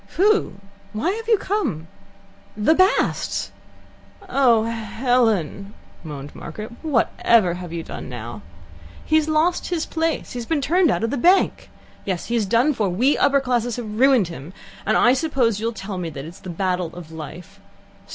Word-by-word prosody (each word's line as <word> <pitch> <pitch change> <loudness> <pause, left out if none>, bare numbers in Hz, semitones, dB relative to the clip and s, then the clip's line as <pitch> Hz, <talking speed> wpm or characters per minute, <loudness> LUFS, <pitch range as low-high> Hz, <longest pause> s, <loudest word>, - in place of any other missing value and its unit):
"Who? 415 +3 +3 0.4
Why 225 +12 0
have 450 +2 -5
you 450 -2 +5
come?" 280 - -2 0.7
"The 215 +9 +4
Basts." 370 +3 +1 0.8
"Oh, 255 -10 +4
Helen!" 225 - 0 0.3
moaned 145 -3 -8
Margaret. 215 +8 -8
"Whatever 230 - +2
have 175 -1 -7
you 165 -1 -4
done - - -8
now?" 120 -3 -7 0.6
"He 310 - +1
has 315 0 +1
lost 315 +3 +1
his 340 -3 -1
place. 325 0 -2
He 245 - -5
has 230 - -6
been 320 - +1
turned 335 +5 +3
out - - 0
of 225 - 0
his 280 - -1
bank. 365 +7 +3 0.3
Yes, 185 -3 -3
he's 230 -4 0
done 240 +9 +3
for. 210 -6 0
We 245 +11 +2
upper 280 0 +3
classes 245 -3 -1
have 220 -3 -6
ruined 260 -8 +4
him, 165 +1 -9 0.3
and - - +3
I 245 - +5
suppose 260 -7 +1
you'll 225 +2 -1
tell 195 -3 -6
me 175 - -3
it's 155 +4 -9
the 185 - -9
battle 180 0 -1
of 170 -3 -10
life. 175 +5 -9
230 Hz, 165 wpm, -22 LUFS, 180-290 Hz, 0.8 s, you